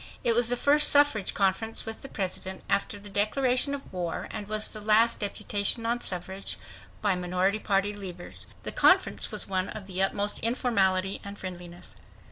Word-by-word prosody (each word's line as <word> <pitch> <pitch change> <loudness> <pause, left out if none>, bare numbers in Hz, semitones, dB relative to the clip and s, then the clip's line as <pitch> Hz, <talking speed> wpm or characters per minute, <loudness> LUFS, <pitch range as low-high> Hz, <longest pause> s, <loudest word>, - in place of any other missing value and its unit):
It 235 - +3
was 235 0 +2
the 245 - +2
first 295 +3 +4
suffrage 285 -9 +4
conference 200 +3 0
with 225 0 -6
the - - -8
President 190 -2 -4
after 200 +1 -1
the 205 - -12
declaration 250 +7 +1
of 275 - -11
war, 175 -2 -3
and 205 - -6
was 215 0 -2
the 215 - -9
last 220 +2 +4
deputation 205 +2 -1
on 240 +1 0
suffrage 190 +2 -4 0.5
by 205 -2 +3
minority 180 +3 0
party 200 0 0
leaders. 185 -4 -9 0.2
The - - -4
conference - - +3
was - - +2
one 185 -1 -1
of 210 -3 -7
the 190 -1 -2
utmost 200 +1 +1
informality 195 -6 +1
and 200 0 -8
friendliness. 175 -1 -9
205 Hz, 170 wpm, -27 LUFS, 190-230 Hz, 0.5 s, first